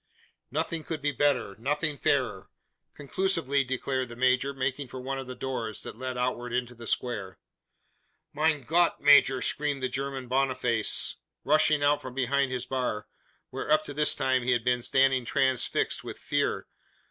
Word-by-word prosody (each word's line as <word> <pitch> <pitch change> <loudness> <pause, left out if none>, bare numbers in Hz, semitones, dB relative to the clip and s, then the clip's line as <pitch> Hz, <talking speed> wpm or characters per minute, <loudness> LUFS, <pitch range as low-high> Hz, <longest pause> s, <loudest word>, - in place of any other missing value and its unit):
"Nothing 160 +3 -2
could 160 0 -4
be 145 - +2
better 140 -7 +1
nothing 150 +5 0
fairer," 125 -9 0 0.5
conclusively 145 -2 0
declared 130 0 -2
the 120 - -9
major, 130 +2 +2
making 135 0 -2
for 130 - -8
one 135 +1 -4
of 135 - -7
the 130 - -6
doors, 120 -5 -4
that - - -7
led 130 +1 -5
outward 125 -1 -2
into 125 0 -1
the 120 -1 -9
square. 105 -7 -2 1.0
"Mein 150 -1 +1
Gott, 170 +6 +2
major!" 140 -3 +6
screamed 145 -2 -1
the 130 - +1
German 135 -1 -4
Boniface, 125 -3 0 0.3
rushing 155 -1 +3
out 145 0 +3
from 130 -1 -8
behind 135 +1 +1
his 125 -1 -2
bar; 125 -5 -2 0.4
where, - - -5
up 155 0 +5
to 145 - -7
this 150 +1 +2
time, 130 -1 +1
he 125 +1 +2
had 120 -2 0
been 125 0 +1
standing 135 +1 +3
transfixed 130 +1 +1
with - - -7
fear. - - -1
130 Hz, 165 wpm, -28 LUFS, 125-145 Hz, 1.0 s, major